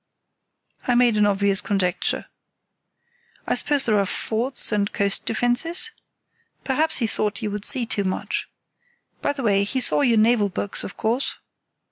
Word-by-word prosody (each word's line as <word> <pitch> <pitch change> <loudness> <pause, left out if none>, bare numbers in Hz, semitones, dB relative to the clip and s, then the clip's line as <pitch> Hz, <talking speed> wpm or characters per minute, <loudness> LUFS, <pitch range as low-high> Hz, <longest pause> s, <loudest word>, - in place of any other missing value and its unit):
I 245 - +3
made 240 -2 +4
an 210 0 +4
obvious 200 -1 +1
conjecture. 195 -2 -1 1.2
"I - - 0
suppose 290 -2 +1
there 215 -3 +3
are 200 - +2
forts 230 +7 0
and 205 -1 0
coast 200 -1 -1
defences? 245 +9 +1 0.7
Perhaps 305 +4 +1
he 240 - 0
thought 215 0 -1
you 210 - -2
would 205 0 -5
see 255 -4 0
too 205 -2 -1
much. 185 -1 -3 0.7
By - - +1
the 275 -2 -6
way, 200 -3 +3
he 260 +6 -1
saw 255 - +3
your 240 -5 +3
naval 215 -1 +3
books, 195 +1 -3
of - - -8
course?" 235 +5 -1
220 Hz, 155 wpm, -23 LUFS, 200-250 Hz, 1.2 s, made